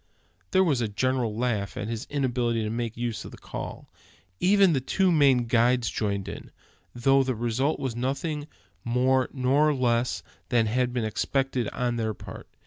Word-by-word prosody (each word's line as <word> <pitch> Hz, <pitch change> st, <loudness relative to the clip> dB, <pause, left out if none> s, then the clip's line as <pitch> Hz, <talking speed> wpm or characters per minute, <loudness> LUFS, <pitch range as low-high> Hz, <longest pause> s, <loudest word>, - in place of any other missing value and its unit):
There 190 Hz, -, +4 dB
was 145 Hz, -9 st, +1 dB
a 115 Hz, -, +1 dB
general 115 Hz, +1 st, -1 dB
laugh 110 Hz, -5 st, -1 dB
at 105 Hz, -, -3 dB
his 115 Hz, 0 st, -4 dB
inability 120 Hz, -5 st, 0 dB
to 105 Hz, -, -2 dB
make 115 Hz, -1 st, -3 dB
use 120 Hz, -2 st, -3 dB
of -, -, -8 dB
the -, -, -12 dB
call; -, -, -7 dB, 0.5 s
even 195 Hz, -2 st, +5 dB
the 135 Hz, -, +1 dB
two 185 Hz, +7 st, +2 dB
Maine 135 Hz, -6 st, +4 dB
guides 120 Hz, +1 st, +2 dB
joining 100 Hz, -3 st, -2 dB
in, 100 Hz, -, -8 dB, 0.4 s
though 135 Hz, +3 st, +4 dB
the 130 Hz, -1 st, -1 dB
result 120 Hz, +6 st, 0 dB
was 130 Hz, -4 st, -3 dB
nothing 145 Hz, +4 st, -2 dB, 0.4 s
more 130 Hz, +2 st, +2 dB
nor 140 Hz, +3 st, +2 dB
less 120 Hz, -1 st, 0 dB, 0.3 s
than 120 Hz, -3 st, +3 dB
had 125 Hz, +3 st, 0 dB
been 120 Hz, -2 st, -1 dB
expected 130 Hz, +2 st, -1 dB
on 120 Hz, -1 st, -2 dB
their 110 Hz, -2 st, -1 dB
part. -, -, -10 dB
125 Hz, 170 wpm, -26 LUFS, 115-135 Hz, 0.5 s, even